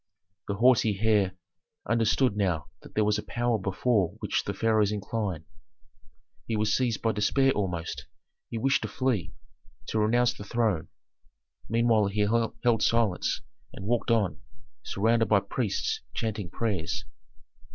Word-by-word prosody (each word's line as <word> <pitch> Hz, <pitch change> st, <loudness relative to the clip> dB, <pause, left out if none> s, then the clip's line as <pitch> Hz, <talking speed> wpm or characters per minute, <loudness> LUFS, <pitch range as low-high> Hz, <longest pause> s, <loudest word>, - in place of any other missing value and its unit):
The 100 Hz, -, -1 dB
haughty 115 Hz, -2 st, +4 dB
heir 105 Hz, -4 st, +2 dB, 0.5 s
understood 115 Hz, +1 st, +2 dB
now 90 Hz, -7 st, -1 dB
that -, -, -15 dB
there 110 Hz, -, +3 dB
was 105 Hz, 0 st, +2 dB
a -, -, -6 dB
power 120 Hz, -2 st, 0 dB
before 95 Hz, 0 st, 0 dB
which -, -, -1 dB
the -, -, -1 dB
pharaohs 110 Hz, -2 st, +2 dB
incline. 100 Hz, -5 st, -3 dB, 1.0 s
He 115 Hz, -, -1 dB
was 105 Hz, 0 st, +2 dB
seized 120 Hz, -4 st, 0 dB
by 115 Hz, -, +3 dB
despair 135 Hz, +6 st, +2 dB
almost; 90 Hz, -7 st, -3 dB, 0.4 s
he 115 Hz, -, -4 dB
wished 135 Hz, +4 st, +2 dB
to -, -, -3 dB
flee, 125 Hz, -9 st, -1 dB, 0.5 s
to 110 Hz, -, 0 dB
renounce 120 Hz, +3 st, +3 dB
the -, -, -9 dB
throne. 105 Hz, -6 st, 0 dB, 0.8 s
Meanwhile 115 Hz, -2 st, +3 dB
he 100 Hz, +1 st, -1 dB
held 115 Hz, +1 st, +1 dB
silence 115 Hz, -6 st, +1 dB, 0.3 s
and 95 Hz, -, -8 dB
walked 120 Hz, +2 st, 0 dB
on, 110 Hz, -5 st, +1 dB, 0.4 s
surrounded 115 Hz, +3 st, +1 dB
by 105 Hz, -, +5 dB
priests 100 Hz, +2 st, -2 dB
chanting 110 Hz, -5 st, -3 dB
prayers. 110 Hz, +2 st, -2 dB
110 Hz, 140 wpm, -28 LUFS, 100-115 Hz, 1.0 s, by